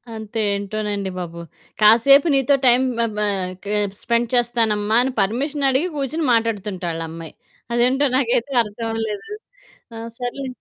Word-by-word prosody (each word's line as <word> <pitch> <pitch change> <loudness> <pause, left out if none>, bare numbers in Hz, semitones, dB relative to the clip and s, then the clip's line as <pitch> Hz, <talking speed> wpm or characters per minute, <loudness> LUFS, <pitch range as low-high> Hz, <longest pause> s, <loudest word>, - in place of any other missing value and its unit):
అంతే 220 +1 -4
ఏంటోనండి 205 0 -3
బాబు, 170 -1 -6 0.4
కాసేపు 235 +8 +6
నీతో 270 +1 +3
టైమ్ 250 +1 +5 0.2
మ - - +3
బ - - -3 0.8
స్పెండ్ 235 -1 0
చేస్తానమ్మా 225 -3 +1
అనే 265 - -1
పర్మిషన్ 275 +8 0
అడిగి 270 +7 +1
కూర్చొని 290 +3 -2
మాట్లాడుతుంట 210 -5 -1
ఆళ్ళమ్మాయి. 165 0 -7 0.4
అదేంటో 255 +4 +2
నాకైతే 245 +1 0
అర్థమవ్వలేదు. 225 - -5 0.6
ఆ - - -7 0.2
సర్లే 255 +2 -4
230 Hz, 120 wpm, -21 LUFS, 210-260 Hz, 0.8 s, కాసేపు